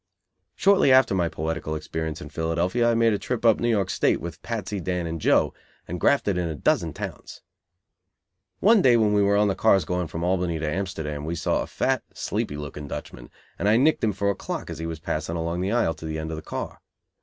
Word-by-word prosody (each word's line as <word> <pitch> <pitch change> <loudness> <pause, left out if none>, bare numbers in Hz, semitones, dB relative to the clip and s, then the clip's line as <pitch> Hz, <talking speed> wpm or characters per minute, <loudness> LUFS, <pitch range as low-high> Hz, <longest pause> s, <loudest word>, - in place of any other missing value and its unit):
Shortly 195 -8 +4
after 130 -4 +5
my 90 -3 +1
poetical 80 0 -3
experience 80 0 -4
in - - -9
Philadelphia 85 +9 0
I 115 - +2
made 115 -1 +3
a 100 - -1
trip 120 -2 -3
up 115 -2 +5
New 120 - +1
York 100 -5 +1
State - - +2
with 85 0 -7
Patsy, 105 -3 -4
Dan 90 -1 -2
and 80 -1 -4
Joe, - - +3 0.3
and 90 +1 -4
grafted 100 -10 +2
in 90 - -1
a 80 - -4
dozen - - +1
towns. - - -8 1.2
One 220 0 +6
day 125 -7 +5
when 105 -2 +3
we 105 - +4
were 100 0 +3
on 105 0 +4
the 100 - +1
cars 95 0 +3
going 90 -1 -1
from 85 +1 -5
Albany 90 -2 0
to 80 0 -3
Amsterdam, 80 -4 -3
we 80 +3 -3
saw 80 - 0
a - - -4
fat, - - 0
sleepy 75 - -3
looking 75 0 -7
Dutchman, - - -8 0.3
and 100 - +2
I 110 - +5
nicked 150 +6 +3
him 110 - +3
for 100 0 0
a - - -4
clock - - -5
as - - -7
he 80 - -3
was 80 -2 -5
passing 80 +1 -3
along 85 +1 -2
the 95 +2 -1
aisle 115 -9 +2
to 80 +1 -10
the 80 0 -3
end 80 0 -4
of - - -3
the 80 - -6
car. - - -6
90 Hz, 230 wpm, -25 LUFS, 80-105 Hz, 1.2 s, One